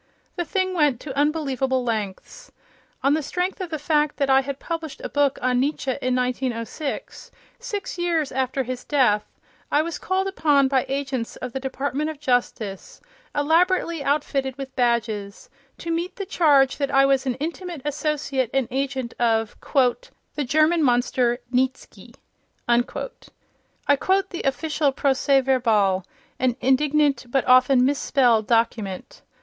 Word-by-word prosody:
The 345 - -2
thing 375 +3 -1
went 295 -8 +2
to 270 -3 -7
unbelievable 275 -3 0
lengths. 225 - -5 0.5
On 275 +1 +4
the 315 - +1
strength 360 +6 -3
of 365 - -4
the 315 - -3
fact 300 0 +1
that 275 -2 +1
I 265 0 +6
had 275 0 -5
published 325 -2 -5
a - - -4
book 285 -1 +1
on 250 -1 +2
Nietzsche 275 0 -1
in 255 -1 0
1906, 250 +2 -3 0.3
six 405 -3 -5
years 335 -4 0
after 260 +1 -1
his 250 0 -5
death, 245 -8 +1 0.3
I 295 - +3
was 335 -1 -5
called 375 +1 -1
upon 295 -8 +3
by 265 -1 +1
agents 270 -4 -3
of 250 -2 -7
the 265 - -2
Department 275 +3 -2
of 310 -3 -7
Justice, 245 -7 -2 0.4
elaborately 330 +1 +2
outfitted 275 -2 -1
with 270 -1 -7
badges, 225 -5 -1 0.3
to 335 - -5
meet 340 +2 -2
the 400 -5 -5
charge 285 -7 +3
that 280 -1 -1
I 275 0 +4
was 270 0 +2
an 250 - 0
intimate 330 +1 -5
associate 290 -4 -1
and 265 -3 +1
agent 265 -2 -2
of 225 -2 +1
"the 290 - -1
German 310 +5 +3
monster, 245 -2 +2 0.2
Nietzsky." 260 +1 -2 0.5
I 240 0 +4
quote - - -8 1.0
the 345 - -4
official 290 +2 0
procès 270 0 +2
verbal, 215 -8 +2 0.4
an 255 -2 +1
indignant 285 0 +2
but 270 +1 +1
often 255 0 +5
misspelled 255 -5 +2
document. 230 - -1
270 Hz, 145 wpm, -23 LUFS, 250-305 Hz, 1.0 s, I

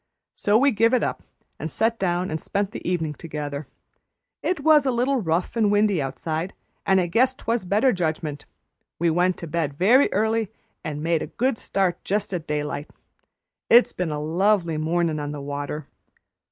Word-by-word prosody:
So 205 +1 +2
we 275 +4 +4
give 230 +2 +3
it 250 - +1
up, - - -2 0.4
and - - -4
set 225 +1 0
down 180 -1 0
and 155 -1 -3
spent 200 0 -2
the - - -7
evenin' 160 -4 -1
together. 150 -2 -6 0.7
It 360 -5 -1
was 300 -2 +5
a - - +3
little 250 +2 +1
rough 170 +2 -1
and 215 -3 +3
windy 205 -5 +3
outside, 155 +6 -3 0.3
and 190 -1 +5
I 180 - +2
guess 250 +9 +2
'twas 230 -5 -2
better 215 +8 +3
judgment; 155 -5 -3 0.5
we 170 0 +2
went 180 +2 +2
to - - -7
bed 155 -3 -2
very 235 - +4
early 220 +1 +1 0.3
and 150 -1 -4
made 165 -1 +1
a - - -3
good 245 -1 -1
start 185 -3 -1
just 205 0 -1
at 170 -3 -4
daylight. 150 0 -3 0.8
It's 240 +2 +6
been 180 -2 -2
a 150 -1 -3
lovely 170 +1 +1
mornin' 160 0 0
on 145 0 -4
the 145 - -6
water. 145 +1 -5
180 Hz, 180 wpm, -24 LUFS, 155-220 Hz, 0.8 s, It's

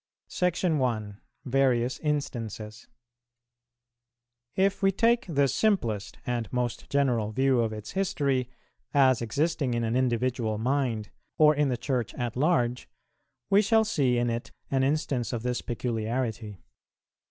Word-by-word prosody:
SECTION 175 -4 0
I. 110 -5 -1 0.3
VARIOUS 130 -2 +1
INSTANCES. 115 -8 -4 1.7
If 195 +1 +1
we 195 0 +4
take 230 +4 +2
the 140 -3 +3
simplest 125 - 0
and 120 -2 -2
most 125 -2 -2
general 125 -6 +1
view 130 +2 +2
of 115 -1 0
its 105 -1 -7
history, 140 -10 0 0.5
as 130 -4 +5
existing 140 +2 0
in 120 - 0
an 115 +1 0
individual 120 -3 0
mind, 120 -3 -1 0.3
or 155 -1 +6
in 145 -1 +1
the 125 - -1
Church 120 -2 -2
at 120 -2 -3
large, 125 -4 +1 0.6
we 200 +1 +6
shall 220 +2 +3
see 135 - +1
in 120 0 +1
it 115 0 -4 0.2
an 135 -1 +2
instance 135 -3 0
of 115 -1 -3
this 125 0 -1
peculiarity. 115 -2 -3
125 Hz, 130 wpm, -27 LUFS, 115-145 Hz, 1.7 s, or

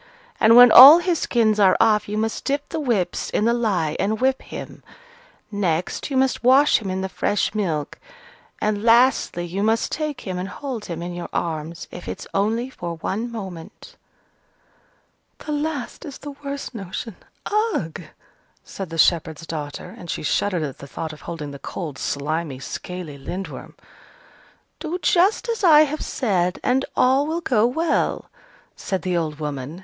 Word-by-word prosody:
And 225 +1 +6
when 245 -1 +9
all 275 +6 +12
his 345 -1 0
skins 220 -3 +1
are 190 -2 +5
off, 215 -2 +3
you 210 - -3
must 220 +1 -2
dip 285 +1 -2
the 325 - -3
whips 235 - -1
in 210 - 0
the 235 - +3
lye 190 -10 0
and 215 +2 0
whip 265 +1 +1
him; - - -9 0.7
next, 180 - -2
you 270 - -1
must 265 -1 +1
wash 270 +4 +5
him 205 -4 -6
in 185 0 -2
the 190 - -2
fresh 205 +2 -1
milk; 165 -9 -2 0.6
and, 210 -1 -1
lastly, 230 -6 +3
you 180 +3 -4
must 225 +2 +1
take 305 -3 -3
him 185 -2 -4
and 185 +2 -4
hold 260 -5 -6
him 170 -1 -5
in 175 0 -5
your 175 0 -6
arms, 165 0 -4
if 175 - -9
it's - - -6
only 220 +5 0
for 170 -7 -6
one 220 +8 -3
moment." 195 - -9 1.4
"The 300 - -7
last 295 -1 -3
is 290 -5 -8
the 290 - -8
worst 280 0 -7
notion 200 0 -6 0.6
ugh!" 160 -1 -4 0.6
said 195 -3 -7
the 165 - -6
shepherd's 160 -1 +2
daughter, 150 -3 -6
and 175 - -11
she - - -3
shuddered 180 +2 0
at 140 -3 -6
the 140 - -10
thought 155 +5 -6
of 150 - -13
holding 155 -4 -6
the 140 - -9
cold, 155 -6 -6
slimy, 150 0 -3
scaly 155 +2 -7
Lindworm. 185 +7 -7 1.0
"Do 335 +2 -3
just 380 +7 +3
as 460 -3 -3
I 310 -4 +8
have 305 0 0
said, 185 -7 -1
and 265 +2 +1
all 265 +3 +3
will 330 +2 -2
go 235 -7 +2
well," 320 +7 0 0.5
said 190 -1 -4
the 180 -1 -1
old 155 -3 -2
woman. 145 +1 -5
205 Hz, 170 wpm, -22 LUFS, 170-260 Hz, 1.4 s, all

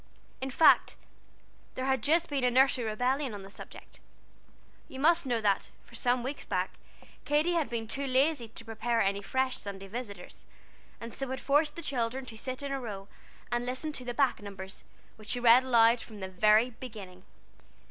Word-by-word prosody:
In 265 - -2
fact, 315 +5 +5 0.8
there 255 - -3
had 265 -2 +1
just 330 +6 +2
been 280 -3 -2
a 250 - +4
nursery 255 -1 +3
rebellion 250 +3 -1
on 200 - -8
the 195 - -11
subject. - - -11 0.9
You 265 - -9
must 325 0 +3
know 240 -2 +1
that, 200 -2 +1
for - - -21
some 245 +1 +1
weeks 275 +3 -5
back, - - -1 0.5
Katy 300 +4 +2
had 325 -7 0
been 230 -1 -3
too 275 +5 -3
lazy 265 -1 +2
to 225 +1 -12
prepare 230 +1 -1
any 200 +1 0
fresh 260 +4 0
Sunday 195 -1 -7
Visitors, 205 -4 -8 0.6
and 230 0 -8
so 270 - -4
had 260 0 -3
forced 295 +2 +2
the 335 - -6
children 255 -1 -2
to 230 - -9
sit 255 +4 -5
in 280 - -3
a 275 -1 -2
row 200 -4 -7 0.4
and 240 0 0
listen 255 +5 -3
to 260 - -6
the 245 -1 -5
back 270 -4 +2
numbers, 195 -1 -8 0.3
which 215 0 -12
she 245 - -1
read 245 +1 +7
aloud 235 -2 +4
from 215 -3 -11
the 190 - -4
very 215 +6 +4
beginning! 210 -7 -10
245 Hz, 190 wpm, -30 LUFS, 220-270 Hz, 0.9 s, read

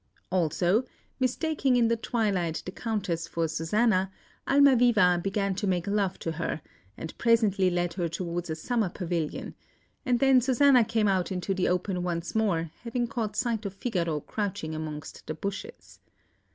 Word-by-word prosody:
Also, 180 - +2 0.4
mistaking 270 +1 +1
in 240 -2 +4
the 230 - +2
twilight, 200 -8 -1
the 185 - -5
Countess 195 -7 -2
for 165 0 -1
Susanna, 185 +4 +1 0.4
Almaviva 240 -10 +5
began 195 +1 0
to 200 +2 -2
make 180 -2 0
love 200 -2 0
to 165 - -3
her, 160 -2 -3 0.3
and 160 - -7
presently 215 -5 +3
led 175 -1 -1
her 175 -2 -2
towards 170 0 -4
a 160 - -1
summer 220 +4 -1
pavilion; 170 -4 -3 0.5
and 245 -2 +1
then 270 -2 +5
Susanna 260 0 +5
came 220 -1 +1
out 190 -1 +1
into 185 +1 -1
the 185 -1 0
open 180 0 0
once 170 -1 -3
more, 175 -8 0
having 240 +1 -1
caught 230 -4 -3
sight 230 -3 0
of 200 -2 -5
Figaro 170 -9 -1
crouching 200 -6 -3
amongst 155 -1 -7
the 155 - -3
bushes. 200 +4 -7
195 Hz, 155 wpm, -28 LUFS, 175-230 Hz, 0.5 s, Almaviva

